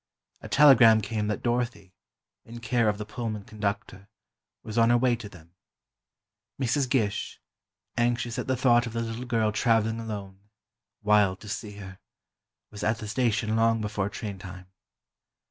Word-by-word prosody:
A -, -, -9 dB
telegram 125 Hz, -6 st, +7 dB
came 105 Hz, 0 st, -3 dB
that 105 Hz, -, -3 dB
Dorothy, 120 Hz, -5 st, -2 dB, 0.5 s
in 120 Hz, +1 st, -10 dB
care 115 Hz, -1 st, +1 dB
of 105 Hz, -, -1 dB
the 105 Hz, -, -6 dB
Pullman 110 Hz, -2 st, -5 dB
conductor, 100 Hz, -1 st, -5 dB, 0.5 s
was 110 Hz, -1 st, -7 dB
on 115 Hz, -1 st, +4 dB
her 120 Hz, -, +5 dB
way 125 Hz, 0 st, +2 dB
to 110 Hz, -3 st, -9 dB
them. 85 Hz, -2 st, -17 dB, 1.1 s
Mrs. 130 Hz, +1 st, 0 dB
Gish, 110 Hz, -6 st, -1 dB, 0.6 s
anxious 120 Hz, 0 st, 0 dB
at -, -, -4 dB
the 130 Hz, -1 st, 0 dB
thought 120 Hz, -1 st, +3 dB
of 115 Hz, -, -7 dB
the 115 Hz, -, -2 dB
little 115 Hz, +2 st, -5 dB
girl 115 Hz, -3 st, +1 dB
traveling 115 Hz, 0 st, +1 dB
alone, 100 Hz, -4 st, -7 dB, 0.6 s
wild 105 Hz, -3 st, +3 dB
to 105 Hz, -, -11 dB
see 105 Hz, 0 st, -5 dB
her, 95 Hz, -2 st, -10 dB, 0.7 s
was 105 Hz, -, -8 dB
at 110 Hz, +1 st, +1 dB
the 110 Hz, -, -7 dB
station 110 Hz, -1 st, 0 dB
long 115 Hz, 0 st, +3 dB
before 105 Hz, -2 st, -2 dB
train 100 Hz, -1 st, -6 dB
time. 90 Hz, 0 st, -10 dB
110 Hz, 160 wpm, -27 LUFS, 105-120 Hz, 1.1 s, telegram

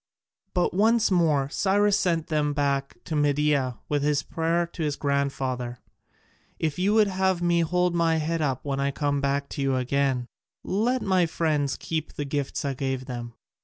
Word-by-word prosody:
But 180 Hz, -, +1 dB
once 220 Hz, +3 st, +3 dB
more 155 Hz, -6 st, +3 dB
Cyrus 205 Hz, +4 st, +2 dB
sent 170 Hz, -5 st, +1 dB
them 150 Hz, -2 st, 0 dB
back 140 Hz, -1 st, -1 dB
to 160 Hz, -, -4 dB
Media 145 Hz, -4 st, +1 dB
with 145 Hz, -1 st, 0 dB
this 145 Hz, -1 st, +1 dB
prayer 165 Hz, +3 st, 0 dB
to 170 Hz, 0 st, -9 dB
his 150 Hz, -2 st, 0 dB
grandfather: 135 Hz, -4 st, -1 dB, 0.8 s
"If 155 Hz, 0 st, -2 dB
you 200 Hz, +4 st, +2 dB
would 215 Hz, -1 st, +6 dB
have 190 Hz, -2 st, 0 dB
me 170 Hz, 0 st, +3 dB
hold 180 Hz, +2 st, +1 dB
my 165 Hz, -1 st, +2 dB
head 160 Hz, +1 st, -1 dB
up 135 Hz, -3 st, -1 dB
when 140 Hz, -1 st, -2 dB
I 140 Hz, 0 st, +1 dB
come 145 Hz, 0 st, -1 dB
back 140 Hz, 0 st, 0 dB
to -, -, -5 dB
you 135 Hz, -1 st, +1 dB
again, 130 Hz, 0 st, 0 dB, 0.4 s
let 235 Hz, +6 st, 0 dB
my 185 Hz, -3 st, +2 dB
friends 150 Hz, -4 st, 0 dB
keep 160 Hz, -2 st, -4 dB
the 145 Hz, -, -4 dB
gifts 145 Hz, +1 st, -3 dB
I 140 Hz, -, 0 dB
gave 130 Hz, -1 st, -3 dB
them." 120 Hz, -3 st, -6 dB
150 Hz, 175 wpm, -26 LUFS, 140-175 Hz, 0.8 s, would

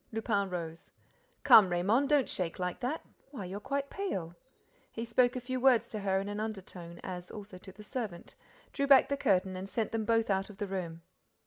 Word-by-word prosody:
Lupin 210 Hz, -3 st, 0 dB
rose: 165 Hz, -2 st, -6 dB, 0.5 s
"Come, 200 Hz, -4 st, +8 dB
Raymonde, 200 Hz, +10 st, +2 dB
don't 290 Hz, -4 st, +4 dB
shake 175 Hz, -3 st, -2 dB
like 180 Hz, -1 st, -3 dB
that. 260 Hz, +6 st, -3 dB, 0.2 s
Why, 255 Hz, -9 st, -7 dB
you're 190 Hz, +3 st, -5 dB
quite 280 Hz, +5 st, -3 dB
pale!" 190 Hz, -, -3 dB, 0.6 s
He 230 Hz, -, -4 dB
spoke 245 Hz, +2 st, +3 dB
a -, -, -1 dB
few 255 Hz, +1 st, -3 dB
words 250 Hz, -2 st, +4 dB
to 215 Hz, -, -4 dB
her 190 Hz, -1 st, +1 dB
in 195 Hz, -, -4 dB
an 205 Hz, 0 st, -4 dB
undertone, 185 Hz, -5 st, -6 dB
as 180 Hz, -1 st, -6 dB
also 200 Hz, -3 st, -9 dB
to 190 Hz, -, -11 dB
the 210 Hz, +3 st, -13 dB
servant, 210 Hz, -6 st, -5 dB, 0.4 s
drew 280 Hz, -1 st, 0 dB
back 275 Hz, -1 st, +7 dB
the 280 Hz, -, +1 dB
curtain 190 Hz, -7 st, +1 dB
and 190 Hz, +1 st, -6 dB
sent 220 Hz, +2 st, -2 dB
them 225 Hz, -1 st, -1 dB
both 225 Hz, -1 st, +2 dB
out 195 Hz, +1 st, 0 dB
of 205 Hz, -, -12 dB
the 205 Hz, -, -2 dB
room. 175 Hz, -4 st, -5 dB
205 Hz, 205 wpm, -31 LUFS, 185-240 Hz, 0.6 s, Come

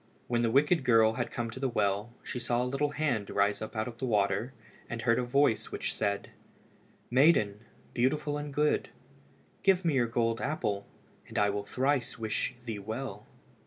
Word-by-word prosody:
When 120 Hz, -1 st, +1 dB
the 115 Hz, -, +2 dB
wicked 150 Hz, +6 st, +3 dB
girl 115 Hz, -3 st, +5 dB
had 120 Hz, 0 st, -2 dB
come 115 Hz, -1 st, -3 dB
to 130 Hz, -, -8 dB
the 135 Hz, 0 st, 0 dB
well, 105 Hz, 0 st, 0 dB
she 125 Hz, -, -4 dB
saw 120 Hz, 0 st, 0 dB
a -, -, -1 dB
little 135 Hz, +3 st, 0 dB
hand 140 Hz, -9 st, -1 dB
rise 100 Hz, 0 st, +1 dB
up 110 Hz, +1 st, -6 dB
out 110 Hz, +1 st, -1 dB
of 120 Hz, -1 st, -8 dB
the 130 Hz, -, -1 dB
water, 105 Hz, +2 st, +1 dB, 0.4 s
and 115 Hz, -1 st, -4 dB
heard 115 Hz, -1 st, +3 dB
a -, -, 0 dB
voice 130 Hz, -1 st, +2 dB
which -, -, -2 dB
said 100 Hz, 0 st, -2 dB, 0.8 s
"Maiden, 125 Hz, -7 st, +4 dB, 0.3 s
beautiful 145 Hz, +4 st, +1 dB
and 145 Hz, 0 st, -4 dB
good, 150 Hz, +2 st, +1 dB, 0.7 s
give 190 Hz, -2 st, +3 dB
me 165 Hz, -, +3 dB
your 125 Hz, -3 st, +2 dB
gold 115 Hz, 0 st, 0 dB
apple 105 Hz, -9 st, -2 dB, 0.4 s
and -, -, -7 dB
I 105 Hz, 0 st, +3 dB
will 100 Hz, 0 st, -3 dB
thrice 130 Hz, +1 st, 0 dB
wish 110 Hz, +2 st, -2 dB
thee 110 Hz, -3 st, -4 dB
well." 110 Hz, +7 st, -6 dB
120 Hz, 185 wpm, -30 LUFS, 110-135 Hz, 0.8 s, girl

